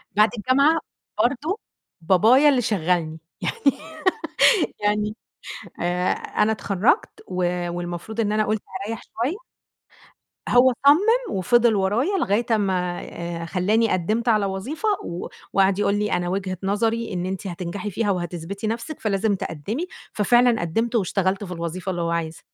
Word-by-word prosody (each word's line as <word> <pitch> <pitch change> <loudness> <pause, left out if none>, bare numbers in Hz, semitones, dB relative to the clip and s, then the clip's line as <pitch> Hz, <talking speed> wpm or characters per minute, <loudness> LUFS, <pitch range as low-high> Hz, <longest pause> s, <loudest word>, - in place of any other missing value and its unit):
بعد 210 +1 +5
الجامعة 275 +8 +3 0.4
برضه 290 - 0 0.4
بابايا 220 - +5
اللي 260 -3 +3
شغّلني 175 -6 0 0.2
يعني 275 -1 +1 1.1
يعني 210 +1 0 0.7
آآ، 180 +1 +1
أنا 220 - 0
اتخرّجت 215 - 0
و 180 -1 -1
والمفروض 175 +5 -5
إن 210 -2 +1
أنا 215 0 +2
قُلت 215 0 -1 0.2
هاريّح 220 +2 -4
شوية 250 +10 -3 1.1
هو 245 +1 +5
صَمِّم 445 +10 +4
وفضِل 240 +3 +3
ورايا 220 - +1
لغاية 230 - +1
أمّا 185 -4 0
آآ 170 -1 -6
خلّاني 210 +6 +1
قدِّمت 215 +7 0
على 210 -3 +3
وظيفة 240 - -3 0.2
و 170 +1 -5 0.3
وقعَد 195 0 +3
يقول 200 0 +2
لي: 210 0 -1
"أنا 175 0 0
وجهة 185 0 -2
نظري 225 +3 0
إن 180 -1 -2
أنتِ 190 +1 -4
هتنجحي 180 +3 -5
فيها 205 +2 0
وهتثبِتي 180 +3 -4
نَفْسِك 235 +7 -4
فلازم 205 0 +1
تقدِّمي." 200 - -4 0.3
ففعلًا 240 +2 +3
قدّمت 225 +8 -1
واشتغلت 195 -1 0
في 180 - -7
الوظيفة 170 +2 -4
اللي 175 -2 -3
هو 170 - -1
عايزها. 165 -1 -3
205 Hz, 140 wpm, -23 LUFS, 180-230 Hz, 1.1 s, بعد